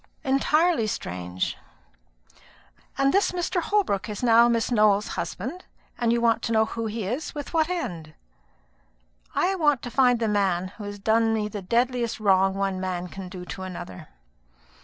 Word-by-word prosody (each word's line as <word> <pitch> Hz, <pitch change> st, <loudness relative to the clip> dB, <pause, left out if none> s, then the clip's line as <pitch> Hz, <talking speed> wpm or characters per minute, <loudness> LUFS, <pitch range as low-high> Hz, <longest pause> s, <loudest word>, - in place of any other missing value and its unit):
"Entirely 300 Hz, 0 st, +2 dB
strange." 90 Hz, -, -3 dB, 1.4 s
"And 275 Hz, 0 st, +3 dB
this 395 Hz, -2 st, +2 dB
Mr. 355 Hz, 0 st, -1 dB
Holbrook 320 Hz, -, 0 dB
is 210 Hz, +3 st, -5 dB
now 235 Hz, 0 st, +6 dB
Miss 230 Hz, +1 st, 0 dB
Nowell's 210 Hz, -3 st, +3 dB
husband? 340 Hz, +9 st, -5 dB, 0.4 s
and 235 Hz, -1 st, +2 dB
you 235 Hz, -, +2 dB
want 230 Hz, -1 st, +2 dB
to 230 Hz, -, -3 dB
know 220 Hz, -1 st, +4 dB
who 225 Hz, 0 st, -4 dB
he 220 Hz, -1 st, -4 dB
is? 255 Hz, +12 st, -4 dB
With 290 Hz, +2 st, -6 dB
what 320 Hz, 0 st, +2 dB
end?" 175 Hz, -, -4 dB, 1.2 s
"I 380 Hz, -, +2 dB
want 295 Hz, -8 st, +2 dB
to 245 Hz, -, -6 dB
find 250 Hz, -2 st, +4 dB
the 225 Hz, -, 0 dB
man 190 Hz, -3 st, +1 dB
who 205 Hz, +2 st, -10 dB
has 205 Hz, 0 st, -6 dB
done 225 Hz, +2 st, +2 dB
me 210 Hz, -1 st, -1 dB
the 205 Hz, -1 st, -6 dB
deadliest 240 Hz, +3 st, 0 dB
wrong 195 Hz, -2 st, +3 dB
one 195 Hz, -1 st, -1 dB
man 180 Hz, -1 st, -3 dB
can 190 Hz, 0 st, -8 dB
do 180 Hz, -1 st, -8 dB, 0.2 s
another." 175 Hz, -, -8 dB
225 Hz, 160 wpm, -25 LUFS, 195-265 Hz, 1.4 s, now